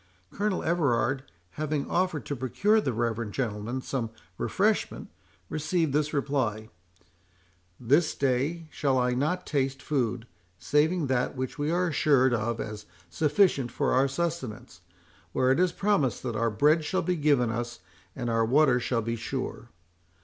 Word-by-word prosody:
Colonel 205 -1 -1
Everard 135 -5 +1 0.4
having 150 -2 -1
offered 180 -4 0
to 145 - -3
procure 200 - +2
the 135 - -1
reverend 115 -2 -2
gentleman 120 0 -3
some 120 -5 -2 0.3
refreshment, - - 0 0.4
received 155 -1 -1
this 150 0 +1
reply:—"This 90 - -3
day 140 +5 0
shall 135 -3 +1
I 125 0 +2
not 155 +8 -1
taste 135 -2 -1
food, 125 -5 -1 0.3
saving 150 - +2
that 130 -1 0
which 130 +2 -4
we 145 +1 0
are 175 +1 +1
assured 140 -4 +3
of 115 0 -1
as 105 -1 -6 0.2
sufficient 150 - +2
for - - 0
our 130 +2 +4
sustenance, 135 - -4 0.5
where 130 0 +3
it 135 - +2
is 180 -1 +3
promised 195 - 0
that 120 -3 -3
our 115 +2 +1
bread 150 +9 +3
shall 185 +5 -1
be 180 - 0
given 145 -7 +2
us, 120 +1 -4 0.3
and 120 -2 -4
our 115 -1 +2
water 130 +2 +4
shall 120 -2 -1
be 115 +1 -2
sure. 120 +1 -5
130 Hz, 145 wpm, -28 LUFS, 115-150 Hz, 0.5 s, our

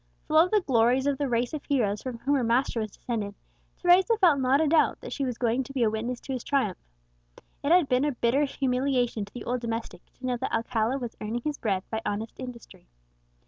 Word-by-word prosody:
Full 310 - +2
of 345 +3 +5
the 425 0 +3
glories 255 -3 +2
of 285 -2 0
the 285 -2 0
race 240 +2 0
of 305 - -4
heroes 215 -8 0
from 255 -3 -5
whom 275 +5 -1
her 270 -3 +2
master 235 +1 +1
was 215 -1 -2
descended, 205 -2 -4 0.4
Teresa 365 +6 +4
felt 345 -9 +4
not 265 +2 +3
a 320 - +3
doubt 315 +1 +3
that - - -7
she 280 - -2
was 250 -3 -3
going 240 +1 +1
to 275 - -11
be 260 -3 +1
a 215 - +2
witness 235 +3 -3
to 270 - -5
his 255 - -4
triumph. 260 -10 0 0.8
It 285 - +1
had 350 -4 +5
been 255 +2 +2
a 295 - +1
bitter 250 +4 +2
humiliation 255 -5 0
to 205 - -19
the 245 - -6
old 250 0 -2
domestic 230 -5 -4
to 260 - -10
know 250 -1 0
that 260 - -3
Alcala 230 +2 0
was 240 -4 -6
earning 225 +3 -3
his 300 -1 -3
bread 195 -4 -1
by 220 0 -2
honest 215 +2 -3
industry. 245 - -10
250 Hz, 230 wpm, -27 LUFS, 230-280 Hz, 0.8 s, of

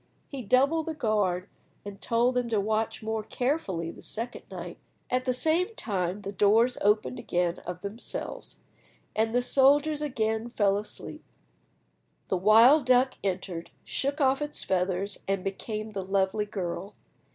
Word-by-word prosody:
He 275 -2 -5
doubled 275 +8 +2
the 320 - -3
guard, 205 -8 0 0.4
and 200 -1 -8
told 240 +2 +2
them 250 -1 0
to 220 -2 +1
watch 215 +2 -1
more 220 0 -1
carefully 210 - -2
the - - -13
second 230 +2 -4
night. - - -7 0.3
At 255 +1 +1
the 255 - +2
same 330 - +1
time 190 - -2
the 200 0 -5
doors 220 +5 +4
opened 210 +4 +2
again 175 0 -1
of 180 0 -5
themselves, 225 - -6 0.5
and 225 +1 +1
the 245 - +3
soldiers 290 +4 +4
again 225 -5 -1
fell 205 -4 +2
asleep. 210 - -9 1.1
The 190 - +1
wild 230 - +6
duck 255 +1 +4
entered, 185 -3 -3 0.2
shook 280 +3 -2
off 270 0 +3
its 295 0 -3
feathers, 190 +1 -1
and 195 -1 0
became 215 +2 -4
the 200 -2 -3
lovely 195 +2 +1
girl. 195 -1 -5
220 Hz, 150 wpm, -28 LUFS, 195-255 Hz, 1.1 s, wild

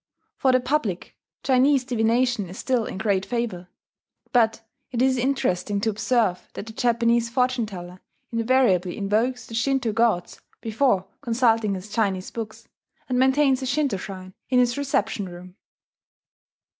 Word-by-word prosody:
For 265 - +2
the 255 - +4
public, 250 - -2 0.3
Chinese 265 +1 +4
divination 240 -3 +1
is 185 - -9
still 250 -4 0
in - - -6
great 195 -2 +1
favour; 225 -6 -3 0.7
but 225 -2 +3 0.3
it 240 - -3
is 260 +1 +3
interesting 245 -7 0
to 220 - +1
observe 215 -3 0
that - - -6
the 220 - -9
Japanese 235 0 +2
fortune 250 -1 +1
teller 180 -2 -9 0.3
invariably 230 -7 +2
invokes 225 +5 0
the - - -11
Shinto 250 0 +1
gods 225 -6 0 0.2
before 220 -4 +1 0.2
consulting 225 -3 +2
his 185 +2 -7
Chinese 200 -3 -1
books, 220 -2 -7 0.4
and 250 -1 +1
maintains 265 0 +3
a 260 - -3
Shinto 275 -5 0
shrine 185 0 -8 0.2
in 255 - +2
his 245 -1 +3
reception 220 -8 -1
room. 180 +1 -11
230 Hz, 145 wpm, -24 LUFS, 200-255 Hz, 0.7 s, the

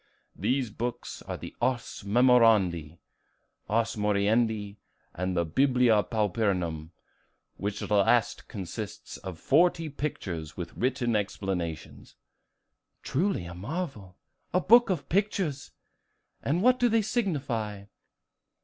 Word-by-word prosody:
These 130 -4 0
books 120 +2 -5
were - - -4
the - - -9
'Ars 130 -2 -1
Memorandi,' 105 -8 +4 0.7
'Ars 115 +1 +1
Moriendi,' 105 0 +1 0.4
and 90 +1 -2 0.2
'Biblia 125 -4 +4
Pauperum,' 95 -8 -1 0.7
which 100 +1 -3
last 105 +3 +2
consists 100 +1 -7
of 95 -3 -7
forty 165 - +3
pictures, 90 - -5
with 85 -2 -6
written 125 -2 0
explanations." 95 -6 -4 0.9
"Truly 170 - 0
a 85 - -7
marvel, 105 - -5 0.4
a - - +5
book 235 +6 +6
of 150 -8 -1
pictures! 185 -7 -1 0.7
And 165 +7 0
what 255 +1 +5
do 245 - +4
they 225 -1 +3
signify?" 135 - -2
115 Hz, 105 wpm, -28 LUFS, 100-140 Hz, 0.9 s, book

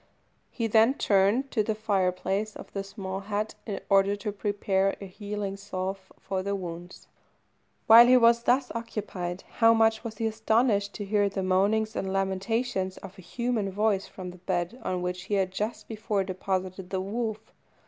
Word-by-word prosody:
He 230 - -3
then 225 +4 +4
turned 210 +5 +2
to 220 - +2
the 215 +1 -1
fire 200 -4 +1
place 195 +4 -3
of - - -11
the 195 - -3
small 195 -1 -6
hut, 205 +2 -3
in 205 - -3
order 195 0 +4
to 205 +1 -4
prepare 200 -1 0
a 200 - -7
healing 200 0 -5
salve 190 -1 -5
for 190 -1 -3
the 200 +1 -2
wounds. 175 -1 -8 0.8
While 230 +2 +9
he 255 +1 +7
was 235 -1 +5
thus 255 +2 +2
occupied, 195 -6 -5
how 230 -1 +6
much 225 0 +3
was 220 -3 -6
he 225 - -2
astonished 220 -2 +1
to 205 - -5
hear 205 0 +2
the 195 -1 -3
moanings 205 +4 +1
and 190 - -2
lamentations 195 +1 -1
of 195 0 -11
a - - -9
human 230 +2 -2
voice 205 0 +1
from 180 -1 -8
the 180 - -14
bed 180 +5 -2
on 180 -1 -2
which 180 0 -3
he 205 - -1
had 190 -2 +1
just 210 +4 -4
before 215 -2 -1
deposited 185 0 -3
the 190 - -1
wolf. 215 +2 -4
200 Hz, 180 wpm, -27 LUFS, 190-220 Hz, 0.8 s, While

